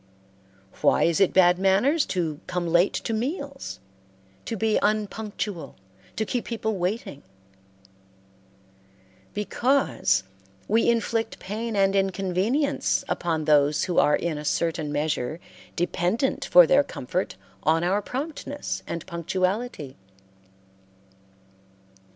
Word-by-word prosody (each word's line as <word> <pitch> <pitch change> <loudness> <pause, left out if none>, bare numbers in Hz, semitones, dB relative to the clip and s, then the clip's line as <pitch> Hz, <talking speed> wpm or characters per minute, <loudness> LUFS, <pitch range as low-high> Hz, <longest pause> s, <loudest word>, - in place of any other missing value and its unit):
Why - - +4
is 170 +1 +2
it 195 - +5
bad 180 -1 +5
manners 205 +12 +3
to 160 -5 -2
come 180 -1 -2
late 170 +3 +3
to 225 - -2
meals, 275 +4 -4 0.7
to 230 - -3
be 220 +1 +2
unpunctual, 210 -5 -2 0.4
to 220 - -1
keep 245 +2 -2
people 220 -3 -3
waiting? 180 -5 -3 2.1
Because 210 - +1 0.4
we 225 +3 +3
inflict 230 -1 0
pain 220 +3 -4
and 195 0 +3
inconvenience 195 - 0
upon 160 -3 -1
those 150 -1 +3
who 180 -2 +1
are 150 - +4
in 165 -3 -2
a - - -7
certain 160 -1 -1
measure 150 0 -1 0.4
dependent 180 - 0
for - - +8
their - - +4
comfort - - -4 0.3
on 160 +2 +2
our 190 +4 +1
promptness 285 +4 -5
and 170 - -5
punctuality. 185 - -2
195 Hz, 110 wpm, -25 LUFS, 170-225 Hz, 2.1 s, for